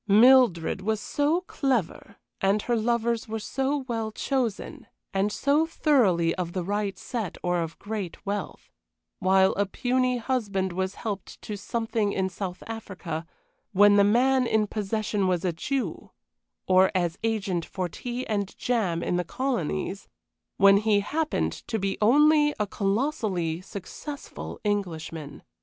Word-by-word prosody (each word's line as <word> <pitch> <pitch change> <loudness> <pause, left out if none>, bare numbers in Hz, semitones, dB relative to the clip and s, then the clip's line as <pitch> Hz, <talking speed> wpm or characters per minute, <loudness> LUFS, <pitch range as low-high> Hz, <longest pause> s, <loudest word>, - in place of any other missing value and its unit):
Mildred 215 -6 +5
was 220 +2 0
so 295 +9 +1
clever, 250 - -2 0.3
and 200 +2 +2
her 240 - +1
lovers 235 0 0
were 220 0 -3
so 270 +5 -2
well 225 -3 -2
chosen, 240 -2 -2 0.3
and 195 +2 +1
so 290 +7 +2
thoroughly 205 - +3
of 175 -2 -4
the 185 - -2
right 200 +1 -2
set 225 -8 -4
or 175 0 +1
of 165 0 -5
great 205 -4 -6
wealth; 205 +1 -4 0.5
while 190 0 +4
a 200 +1 0
puny 250 +3 +1
husband 205 -7 -1
was 190 +2 -2
helped 200 -4 -5
to 210 - -4
something 220 0 -1
in 190 0 0
South 180 0 -6
Africa, 185 -7 -6 0.5
when 205 +1 +6
the 200 - +6
man 250 +4 +3
in 220 -1 +2
possession 210 -1 -1
was 180 -1 0
a 175 - +1
Jew 265 +10 -3 0.6
or 185 0 +5
as 175 -1 0
agent 205 -6 0
for 185 +1 -3
tea 245 +8 -5
and 200 -2 -2
jam 195 -9 0
in 175 - 0
the 180 - 0
colonies 195 - -2 0.5
when 200 0 +7
he 210 -1 +3
happened 305 +9 -1
to 225 - -1
be 195 -1 -2
only 295 +6 +5
a 210 - +2
colossally 195 - -1
successful 205 - -8
Englishman. 165 -7 -3
205 Hz, 145 wpm, -26 LUFS, 190-240 Hz, 0.6 s, when